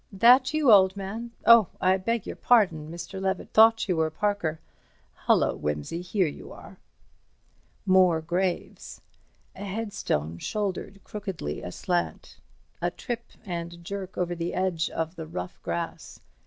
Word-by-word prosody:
"That 245 +6 +5
you, 305 -5 +3
old 190 -1 +6
man? 215 +5 -5 0.2
Oh, 230 -4 +8
I 185 +1 +3
beg 230 +3 -2
your - - -6
pardon, 180 -11 +3
Mr. 170 +3 -7
Levett—thought 220 +4 +3
you 180 -3 0
were 160 0 +2
Parker." 175 -3 -1 0.7
"Hullo, - - +3
Wimsey—here 170 - -2
you 150 - -7
are." - - -13 1.1
More 185 -3 +5
graves. 175 +3 -3 0.5
A - - -8
headstone 190 - -3
shouldered 195 - -3
crookedly 190 - -5
aslant. 175 - -3 0.4
A - - +1
trip 240 -2 -6 0.2
and 170 -2 -6
jerk 195 0 -6
over 175 -1 -1
the 170 0 -3
edge 180 -3 0
of 165 +2 -3
the 160 -1 -6
rough 175 +2 -6
grass. 170 -1 -5
185 Hz, 130 wpm, -26 LUFS, 170-205 Hz, 1.1 s, Oh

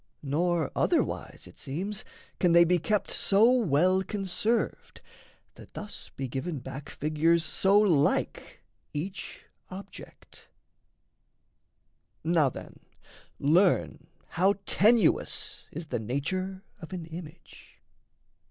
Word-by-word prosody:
Nor 165 +3 0
otherwise, - - -1
it - - -15
seems, 190 +9 -4 0.4
can 175 -2 +3
they 170 0 +8
be 175 +1 +2
kept 210 +5 -1
So 215 +5 +4
well 185 - +3
conserved 205 +4 -2 0.5
that - - -16
thus 210 0 -7
be 135 - -3
given 140 +6 -4
back 135 +3 -8
Figures 160 +2 +1
so 195 +6 +3
like 170 -9 +1 0.3
each 185 +6 -6 0.2
object. 195 +1 -12 1.8
Now 160 -3 +3
then, - - -11 0.6
learn 150 - +2 0.2
How 190 +4 +2
tenuous 215 -3 +2
is 165 +2 -6
the 150 - -3
nature 185 - -3 0.2
of 170 0 -10
an 175 -3 -5
image. 165 0 -12
175 Hz, 105 wpm, -28 LUFS, 150-195 Hz, 1.8 s, they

